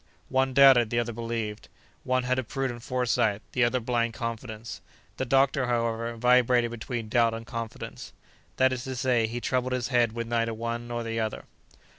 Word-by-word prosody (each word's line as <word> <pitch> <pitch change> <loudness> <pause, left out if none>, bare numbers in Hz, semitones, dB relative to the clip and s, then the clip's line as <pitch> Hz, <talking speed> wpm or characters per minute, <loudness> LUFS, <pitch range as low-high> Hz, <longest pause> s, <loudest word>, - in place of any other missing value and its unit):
One 130 0 +1
doubted, 135 -5 +7
the 120 - -1
other 120 0 0
believed; 115 -2 -4 0.3
one 130 0 +1
had 130 +1 0
a - - -1
prudent 120 +1 -3
foresight, 120 -4 0
the 125 - +2
other 120 +2 +2
blind 115 -1 -1
confidence. 115 -1 -6 0.4
The 130 - -1
doctor, 135 0 +2
however, 115 -1 -1
vibrated 125 0 +3
between 120 0 -5
doubt 115 0 +2
and 115 0 -7
confidence; 115 -1 -7 0.5
that 130 0 +4
is 125 -1 -4
to 130 -1 -4
say, 120 -2 +2
he 120 +2 -4
troubled 130 +1 -1
his 125 -1 -1
head 120 -3 +2
with 115 0 -3
neither 115 -1 -1
one 115 +1 -4
nor 120 0 -3
the 115 0 -3
other. 110 -1 -3
120 Hz, 180 wpm, -27 LUFS, 115-125 Hz, 0.5 s, doubted